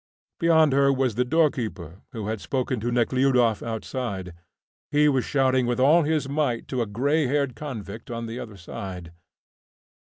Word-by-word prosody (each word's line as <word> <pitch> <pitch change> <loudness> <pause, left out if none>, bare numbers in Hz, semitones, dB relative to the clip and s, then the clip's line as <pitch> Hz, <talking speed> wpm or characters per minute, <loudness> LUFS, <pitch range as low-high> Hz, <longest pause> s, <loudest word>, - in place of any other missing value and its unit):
Beyond 160 -3 +4
her 140 0 +4
was 130 -3 +1
the 125 +4 +1
doorkeeper, 120 - -1
who 110 -5 -5
had 110 -1 -3
spoken 130 -2 -2
to 120 +3 -2
Nekhludoff 125 -1 +2
outside; 110 -5 -4 0.6
he 150 +1 +4
was 135 -4 +2
shouting 130 -3 +2
with 120 0 -1
all 150 +6 +5
his 155 -2 0
might 140 -5 -1
to 130 -2 -1
a 115 - -1
greyhaired 140 +3 0
convict 115 -6 -7
on 115 -1 -4
the 115 +2 -6
other 110 -4 -8
side. 90 -1 -7
125 Hz, 155 wpm, -25 LUFS, 110-140 Hz, 0.6 s, all